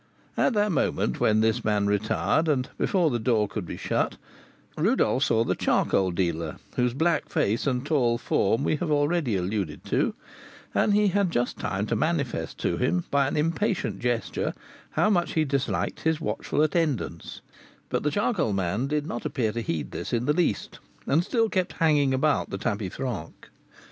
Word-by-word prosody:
At - - +2
that 210 -1 +2
moment - - 0
when 110 0 +3
this 110 0 +1
man 105 -1 +1
retired, 110 +10 +1
and 135 -5 +1
before 175 -6 +2
the 120 - 0
door 110 -2 +2
could 100 -3 -5
be - - -6
shut, - - -1 0.6
Rodolph 160 - +2
saw 115 0 +2
the - - 0
charcoal 95 -1 +1
dealer, 85 -3 -1 0.2
whose 125 0 +1
black 160 +2 +1
face 110 +7 0
and 125 -1 0
tall 125 -6 +2
form 115 +2 +1
we 155 - +1
have 170 +1 -3
already 145 -4 +1
alluded 95 -4 -2
to, - - 0 0.6
and 205 - +3
he 210 -1 +4
had 200 0 +1
just 125 -6 -1
time 100 +1 -2
to - - -1
manifest 155 -6 -1
to - - 0
him, 90 +1 +1
by 140 -1 +3
an 140 - -2
impatient 170 +7 0
gesture, 120 -1 -1 0.3
how 215 - +2
much 175 -3 +1
he 160 -1 +2
disliked 140 -2 -1
his 160 -1 0
watchful 150 -1 -1
attendance; 150 - -1 0.5
but - - 0
the 150 - +1
charcoal 190 - 0
man 100 +7 -1
did 150 0 -1
not 120 - -4
appear 110 -4 -1
to 115 +2 -3
heed 85 -8 -3
this - - -5
in 120 0 0
the 150 - +3
least, 175 +2 -1 0.3
and 155 +5 +2
still 225 +3 +1
kept 185 -4 -1
hanging 150 -4 +3
about 140 +3 +1
the 100 - -4
tapis 100 -3 -3
franc. 125 -12 -6
135 Hz, 180 wpm, -26 LUFS, 110-160 Hz, 0.6 s, he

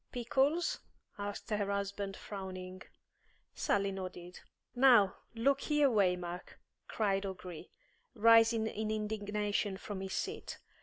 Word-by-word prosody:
"Pickles?" 270 +7 +1 0.4
asked 205 +2 -5
her 205 -1 0
husband, 200 0 -3
frowning. 185 -2 -7 0.7
Sally 200 -1 +1
nodded. 180 -2 -7 0.3
"Now, 240 -7 +5 0.2
look 275 +4 +2
here, 295 -2 +3
Waymark," 180 -4 0 0.3
cried 195 -3 0
O'Gree, 180 -4 -7 0.5
rising 225 0 +6
in 220 0 -3
indignation 210 -2 -1
from 195 -1 -6
his 190 0 -5
seat. - - -4
205 Hz, 105 wpm, -33 LUFS, 190-225 Hz, 0.7 s, rising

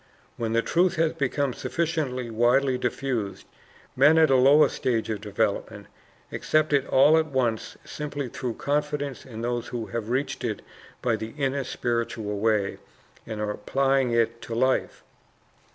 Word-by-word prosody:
When 115 -1 -2
the 115 0 +2
truth 180 +2 +2
has 165 -1 +1
become 140 -1 -1
sufficiently 145 -9 -2
widely 125 +4 +3
diffused, 125 -4 -3 0.5
men 150 +5 +6
at 160 -3 +5
a - - +6
lower 140 +4 +6
stage 115 -4 -1
of 105 -2 -4
development 105 0 -2 0.5
accept 155 -1 +1
it 140 -1 +2
all 150 +4 +5
at 160 - -1
once 125 -6 -1
simply 145 -2 -5
through 120 -1 -4
confidence 145 -2 -2
in 115 -3 -7
those 120 0 -2
who 120 -2 -4
have 115 -1 -5
reached 130 +4 -2
it - - -3 0.4
by 115 -3 +1
the 110 +3 -7
inner 140 -1 0
spiritual 115 -4 -2
way, 105 -2 +1 0.5
and 110 - -5
are 105 0 -1
applying 135 +4 +1
it 115 0 +1
to 115 - -6
life. 130 +2 0
125 Hz, 150 wpm, -26 LUFS, 115-140 Hz, 0.5 s, men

